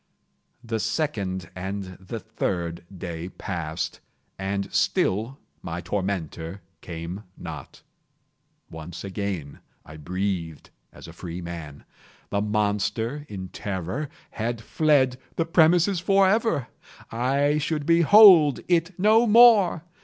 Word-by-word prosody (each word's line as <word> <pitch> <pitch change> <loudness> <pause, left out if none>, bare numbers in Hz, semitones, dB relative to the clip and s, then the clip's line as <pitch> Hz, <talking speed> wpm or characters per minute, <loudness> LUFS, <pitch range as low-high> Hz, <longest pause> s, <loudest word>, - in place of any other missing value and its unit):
The 115 -1 -3
second 100 - -2
and 95 +2 -4 0.2
the 95 +5 -6
third 85 -6 -3
day 85 -1 -6
passed, 85 -5 -5 0.4
and 100 0 -3
still 110 +8 +1 0.2
my 85 0 -5
tormentor 90 -1 -4 0.2
came 85 +3 -6 0.2
not. - - -9 0.9
Once 80 +2 -8
again 95 -7 -4 0.3
I 80 - -11
breathed 90 -1 -4 0.2
as - - -13
a - - -11
freeman. 85 -4 -7 0.5
The 100 - 0
monster, 105 +6 -1
in 95 -2 -7
terror, 100 - -4 0.2
had 115 +1 -3
fled 130 +1 +2 0.2
the 165 - 0
premises 170 +3 +4
forever! 195 - +2 0.4
I 140 +5 +1
should 150 -1 -2
behold 170 -2 +7
it 175 0 +1
no 220 +5 +4
more! 215 -7 +6
105 Hz, 105 wpm, -25 LUFS, -, 0.9 s, behold